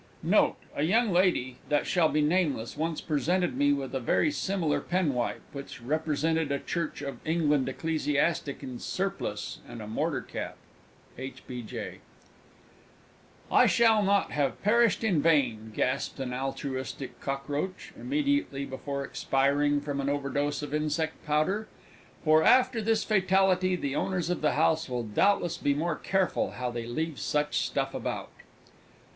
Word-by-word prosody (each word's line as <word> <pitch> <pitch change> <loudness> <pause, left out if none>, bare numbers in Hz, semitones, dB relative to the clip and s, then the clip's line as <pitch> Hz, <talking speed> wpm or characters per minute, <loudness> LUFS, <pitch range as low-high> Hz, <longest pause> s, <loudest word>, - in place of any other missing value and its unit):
Note. - - +3 0.2
A - - -1
young 215 +8 +3
lady, 175 -9 +2
that 145 0 +2
shall 170 -4 +3
be 150 0 +2
nameless, 150 -8 +1
once 160 0 -2
presented 165 +1 0
me 145 +2 +3
with 140 -2 -2
a 135 - 0
very 130 - +2
similar 190 - 0
penwipe, 150 -9 -1
which 140 -2 -7
represented 155 +3 0
a 140 - +1
Church 160 -1 -3
of 140 -1 -5
England 150 -5 +1
ecclesiastic 150 0 -1
in 125 -3 -6
surplice 195 - -3
and 120 - -8
mortar 110 - -1
cap. - - -6 0.6
H. 130 +1 -7
B. 125 -1 -6
J. 110 - -7 1.5
"I - - +6
shall 225 -2 +5
not 200 0 +2
have 140 -3 -1
perished 230 +2 +3
in 185 -9 +2
vain!" 125 -9 +2
gasped 130 +6 -1
an 130 -2 -3
altruistic 135 0 -4
Cockroach, 145 +6 -3
immediately 285 - 0
before 140 +1 -4
expiring 145 +2 +1
from 140 -1 -3
an 140 - -1
overdose 145 +1 -1
of 145 - -5
Insect 155 +1 -1
Powder, 155 +9 +1 0.6
"for, 155 0 +5
after 255 -2 +5
this 220 0 +1
fatality, 190 -2 +3
the 140 -5 -3
Owners 180 -1 -1
of 180 - -2
the 150 - +2
House 160 -2 +2
will 125 -1 -2
doubtless 170 - +1
be 140 -1 +1
more 160 +2 0
careful 190 +2 0
how 125 -1 -3
they 120 -1 -5
leave 155 +4 -3
such 150 0 0
stuff - - -1
about!" - - -4
150 Hz, 145 wpm, -28 LUFS, 140-180 Hz, 1.5 s, I